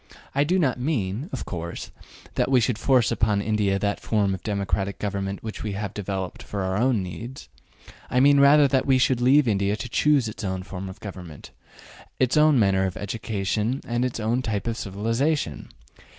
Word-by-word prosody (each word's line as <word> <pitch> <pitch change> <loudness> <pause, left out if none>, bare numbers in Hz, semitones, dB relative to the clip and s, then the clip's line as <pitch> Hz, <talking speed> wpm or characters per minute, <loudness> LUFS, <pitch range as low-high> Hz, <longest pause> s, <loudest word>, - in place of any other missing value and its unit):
I 140 - +3
do 175 +6 +1
not 135 -8 +1
mean, 125 - -2
of - - -5
course, 85 -2 -6 0.4
that - - 0
we 130 -2 +5
should 115 -1 0
force 130 -4 +3
upon 110 -3 +1
India 100 -1 +1
that 100 +1 -1
form 100 -3 0
of 95 - -5
democratic 100 -1 -2
government 100 -1 -3
which 110 -1 -6
we 105 -2 -3
have 100 0 -4
developed 95 -2 -4
for 100 - -5
our 95 0 -1
own 115 -2 +2
needs. 115 +9 -8 0.6
I 125 - +2
mean 140 +1 +6
rather 140 +1 +7
that 135 -1 +1
we 135 -1 +5
should 130 -1 +2
leave 135 +2 +5
India 100 -1 +1
to 125 - -6
choose 140 0 +2
its 110 +1 -7
own 95 -1 -3
form 95 0 -7
of 95 +2 -11
government, 90 -7 -9 0.7
its 130 +2 +2
own 150 -2 +5
manner 95 -3 +3
of 95 - -6
education 105 +3 -2
and 120 +1 0
its 125 -2 -2
own 115 +3 0
type 105 -5 -2
of 115 -1 -1
civilization. 115 - -2
110 Hz, 190 wpm, -24 LUFS, 100-130 Hz, 0.7 s, rather